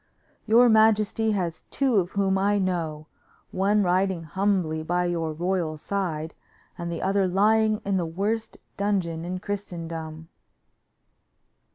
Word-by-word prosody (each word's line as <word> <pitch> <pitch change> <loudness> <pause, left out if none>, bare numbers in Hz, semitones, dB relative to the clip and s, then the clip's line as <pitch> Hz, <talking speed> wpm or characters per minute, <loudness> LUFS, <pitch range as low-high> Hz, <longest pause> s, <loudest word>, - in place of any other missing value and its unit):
"Your 235 +3 +6
majesty 220 0 +3
has 175 -4 -2
two 265 -5 +1
of 180 -2 0
whom 195 -1 +1
I 200 +2 +2
know; 165 -5 -2 0.5
one 200 +2 +2
riding 185 -1 +1
humbly 180 -2 0
by 175 +2 0
your 165 -2 -1
royal 170 -1 -2
side, 160 -3 -3 0.4
and 170 -1 -5
the 170 - -4
other 195 0 +2
lying 215 +3 +3
in 195 -1 +1
the 175 - 0
worst 205 +7 -2 0.2
dungeon 185 -5 -1
in 180 +2 -4
Christendom." 165 -5 -6
185 Hz, 130 wpm, -25 LUFS, 165-205 Hz, 0.5 s, Your